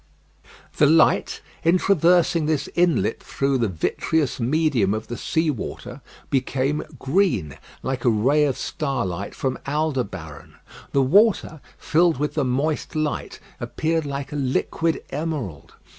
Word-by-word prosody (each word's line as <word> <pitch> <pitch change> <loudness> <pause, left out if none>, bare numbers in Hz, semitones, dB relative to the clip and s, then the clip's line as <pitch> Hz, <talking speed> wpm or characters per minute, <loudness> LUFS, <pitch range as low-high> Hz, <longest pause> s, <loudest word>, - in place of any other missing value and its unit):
The 150 - +5
light, 160 +1 +3 0.2
in 170 +3 +4
traversing 175 -3 +3
this 155 -3 0
inlet 175 -2 +1
through 135 -1 -1
the 115 - +2
vitreous 130 - -1
medium 125 -6 +1
of 110 - -6
the 120 - -3
sea 160 +5 0
water, 125 - -7 0.3
became 135 +2 0 0.2
green, 135 - 0 0.2
like 130 -1 -3
a 125 - +4
ray 135 +7 +3
of 135 -3 -1
starlight 100 - -3
from 130 -1 -2
Aldebaran. 125 - -3 0.4
The 140 - +3
water, 180 - +3 0.2
filled 165 -1 +2
with 150 +2 -1
the 150 - 0
moist 140 +6 -1
light, 155 -1 -2 0.2
appeared 160 -1 -1
like 140 0 -5
a 150 - -3
liquid 145 +4 -1
emerald. 140 - -4
145 Hz, 130 wpm, -23 LUFS, 125-160 Hz, 0.4 s, The